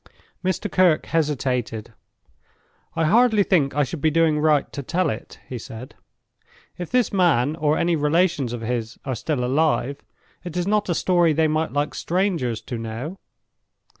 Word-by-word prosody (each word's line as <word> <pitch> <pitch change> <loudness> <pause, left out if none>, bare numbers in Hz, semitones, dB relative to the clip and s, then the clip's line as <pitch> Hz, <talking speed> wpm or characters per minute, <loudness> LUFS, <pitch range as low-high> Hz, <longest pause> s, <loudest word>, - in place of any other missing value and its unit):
Mr. 185 +3 -1
Kirke 185 -6 +3
hesitated. 130 -8 -1 1.0
"I 165 -1 +1
hardly 220 +3 +4
think 155 -9 +1
I 145 - +3
should 145 +3 -5
be 155 - +3
doing 155 -1 +2
right 150 -2 +2
to 140 - -4
tell 165 +3 0
it," 110 - -8
he 125 - -5
said. 115 +3 -9 0.8
"If 175 -2 -6
this 250 -4 +1
man, 155 -7 +3
or 155 -1 +1
any 170 0 +2
relations 150 -3 +1
of 120 -1 -5
his, 115 -1 -3
are 135 - -2
still 125 +2 -2
alive, 140 0 +1 0.4
it 175 -1 -6
is 175 - 0
not 210 0 +1
a 175 - +1
story 175 -3 +3
they 160 +1 +2
might 155 +1 0
like 145 +1 -1
strangers 170 - -1
to 120 - -6
know. 115 +11 -5
155 Hz, 165 wpm, -23 LUFS, 130-175 Hz, 1.0 s, hardly